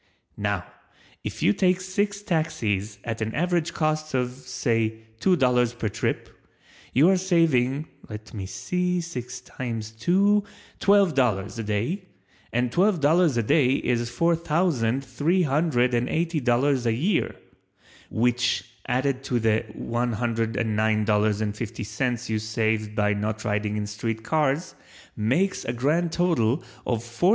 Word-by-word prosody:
Now - - -1 0.6
if - - -5
you 100 - +5
take 185 - +2
six 200 +2 -2
Taxis 110 - -1
at 115 -1 -4
an 110 +1 -2
average 175 0 +1
cost 155 -2 -1
of, 125 -1 0
say 115 -3 -2 0.2
two 190 -1 +4
dollars 125 -5 +2
per 110 -3 -2
trip, - - -2 0.6
you 145 +6 +5
are 190 - +4
saving 155 -6 +2 0.2
(let 105 0 -9
me 100 -4 -5
see, 180 - -1
six 125 -7 -6
times 115 -4 -5
two) 195 - +3 0.4
twelve 200 -4 +4
dollars 115 -5 0
a - - -2
day 115 - -2 0.5
and 120 0 0
twelve 185 - +3
dollars 155 -1 +3
a 115 - +2
day 130 +3 +3
is 120 -3 0
four 170 +7 +2
thousand 150 -7 0
three 155 +9 +1
hundred 135 -4 +2
and 120 +1 +1
eighty 165 0 0
dollars 125 0 +2
a 115 - +3
year, 165 - 0 0.7
which 120 +1 +1 0.2
added 130 +1 0
to 125 -3 0
the 110 0 +1
$109.50 110 0 0
you - - -1
have - - -3
saved 110 -1 -1
by 105 -1 +2
not 105 +1 -3
riding 105 0 -1
in 105 - -2
street 110 +2 -4
cars 150 +4 0 0.4
makes 145 - +1
a 115 - -2
grand 155 +8 +1
total 160 -7 +1 0.2
of 115 -2 0
$4489. 120 +10 +1
125 Hz, 140 wpm, -25 LUFS, 110-165 Hz, 0.7 s, you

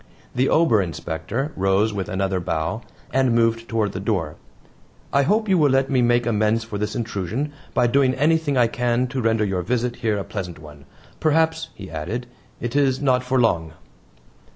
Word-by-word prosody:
The 125 +2 +1
Ober 155 -11 +4
Inspector 90 - -4
rose 95 +3 +2
with 100 0 -3
another 95 -1 -1
bow, 85 +6 -2 0.3
and 130 -3 +3
moved 115 0 +1
toward 110 -3 0
the 95 - -5
door. 95 -7 -1 0.8
"I 140 - +5
hope 215 +9 +1
you 190 -3 +3
will 150 -2 +4
let 135 +1 +2
me 130 -2 +3
make 120 0 +3
amends 110 0 +1
for 110 -3 -6
this 105 +1 -2
intrusion 110 - -3 0.2
by 125 - +4
doing 130 +1 +3
anything 150 -1 +2
I 120 - +5
can 120 +1 0
to 130 0 -2
render 115 -1 +2
your 95 -2 -1
visit 120 +5 -1
here 110 -3 0
a 100 - -2
pleasant 90 -5 -6
one. 75 -2 -13 0.3
Perhaps," 160 +1 +1
he 95 -2 -10
added, 90 +11 -4 0.3
"it 120 +1 -4
is 135 -2 +2
not 130 -3 +2
for 130 +1 +1
long." 85 -9 +1
115 Hz, 180 wpm, -22 LUFS, 100-130 Hz, 0.8 s, I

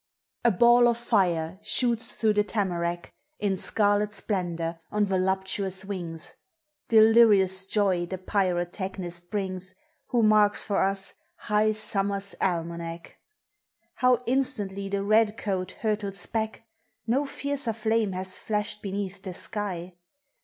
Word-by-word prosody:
A 240 - +5
ball 240 +4 +5
of 235 -1 +2
fire 185 -7 0
shoots 235 -2 0
through 220 -2 +2
the 210 0 +3
tamarack 175 -5 -2 0.2
In 200 -2 0
scarlet 205 +2 +1
splendor, 175 -5 -3
on 210 0 +1
voluptuous 190 0 -1
wings; 170 -5 -4 0.5
Delirious 215 -4 +5
joy 190 -4 +1
the 190 - -4
pyrotechnist 180 -1 -2
brings, 185 -2 -3 0.3
Who 240 -3 +1
marks 210 -1 +5
for 205 - +1
us 195 0 0 0.2
high 210 +1 +1
summer's 200 -2 0
almanac. 170 -1 -3 0.7
How 250 -1 +2
instantly 210 -7 -1
the 200 0 -1
red 215 +1 +3
coat 185 -3 -3
hurtles 205 -4 0
back! 220 0 -3 0.4
No 270 +5 +1
fiercer 280 -4 -1
flame 220 -2 0
has 185 0 -1
flashed 210 -1 -2
beneath 195 -1 -4
the 185 -2 -7
sky. 185 -4 -4
200 Hz, 120 wpm, -27 LUFS, 185-215 Hz, 0.7 s, A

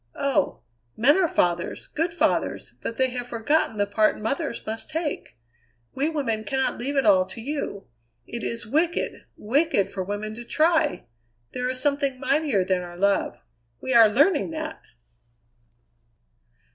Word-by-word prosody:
Oh! 275 -2 0 0.4
men 265 +6 +5
are 370 -2 +3
fathers, 175 - 0
good 330 +3 -2
fathers, 335 - 0
but 230 - -4
they 260 +1 +1
have 245 -1 -4
forgotten 235 +1 0
the 205 - +2
part 215 +1 +2
mothers 275 +5 -3
must 220 +1 -5
take! 305 - -4 0.6
We 280 +4 0
women 260 -9 -1
cannot 265 +5 -1
leave 275 +4 -3
it 275 - +2
all 190 -3 +6
to 210 - -8
you. 240 -6 -4 0.4
It 235 - -6
is 230 -2 -4
wicked, 320 +9 0
wicked 235 - +1
for 190 - -3
women 205 +3 -4
to 235 +2 -8
try! 315 +4 +2 0.5
There 250 0 -2
is 255 0 -3
something 280 -2 0
mightier 275 -8 +1
than 185 -1 +1
our 175 -1 -9
love 200 +1 +1 0.4
we 260 - -2
are 230 -2 +8
learning 290 - +3
that!" 315 0 -5
250 Hz, 150 wpm, -25 LUFS, 215-295 Hz, 0.6 s, are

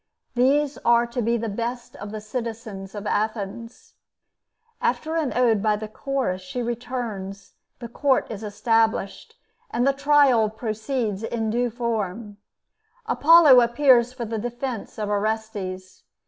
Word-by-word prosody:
These 275 +3 +2
are 235 0 +4
to 240 +1 -4
be 235 +1 +1
the 230 0 -3
best 235 +3 -4
of 205 - -7
the 215 0 -6
citizens 215 -3 -6
of 205 0 -6
Athens. 215 +2 -3 0.9
After 315 +1 -1
an 315 -5 0
ode 230 -5 +3
by 215 0 +2
the 215 +1 -6
Chorus, 235 -5 -2
she 215 +7 -5
returns, 225 -5 -5 0.2
the 240 - -7
court 265 +3 +1
is 215 -2 -6
established, 225 - 0 0.3
and 240 +2 0
the 275 - +3
trial 280 -5 +4
proceeds 220 -1 -3
in 225 -1 -2
due 245 +2 +1
form. 220 -3 -3 0.7
Apollo 325 - +7
appears 240 0 +4
for 250 -2 -6
the 225 0 -3
defense 240 0 -5
of 210 -1 -2
Orestes. 205 -3 -3
230 Hz, 135 wpm, -24 LUFS, 210-250 Hz, 0.9 s, Apollo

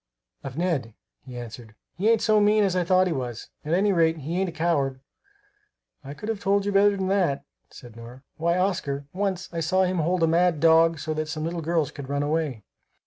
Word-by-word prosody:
"Of 135 +1 -7
Ned," 155 -11 -1 0.3
he 125 -2 -10
answered. 115 -2 -9 0.2
"He 200 +6 +1
ain't 230 -1 +3
so 215 -1 +4
mean 210 +1 +4
as 190 -2 +1
I 180 - +2
thought 185 +1 +3
he 180 - -1
was. 125 -5 -5
At 155 +3 0
any 200 +2 +2
rate, 165 -2 +2
he 160 +5 -3
ain't 190 - 0
a - - -6
coward." 145 -5 0 1.0
"I 140 +1 -8
could 210 - -8
have 220 -2 -2
told 200 +1 +1
you 205 - 0
better 200 0 +4
than 190 - -2
that," 180 -8 +1 0.2
said 120 -3 -13
Nora. 120 +3 -12
"Why, 170 +2 +1
Oscar, 170 -7 -1
once 190 -1 -2
I 170 - -2
saw 185 +4 +2
him 185 -1 0
hold 170 +2 +1
a - - +4
mad 170 0 +2
dog 165 +1 +5
so 155 +2 -3
that 155 0 -3
some 155 0 -4
little 170 +1 -3
girls 160 -3 0
could 140 -2 -9
run 140 0 -1
away. 150 -7 -2
165 Hz, 220 wpm, -25 LUFS, 140-185 Hz, 1.0 s, dog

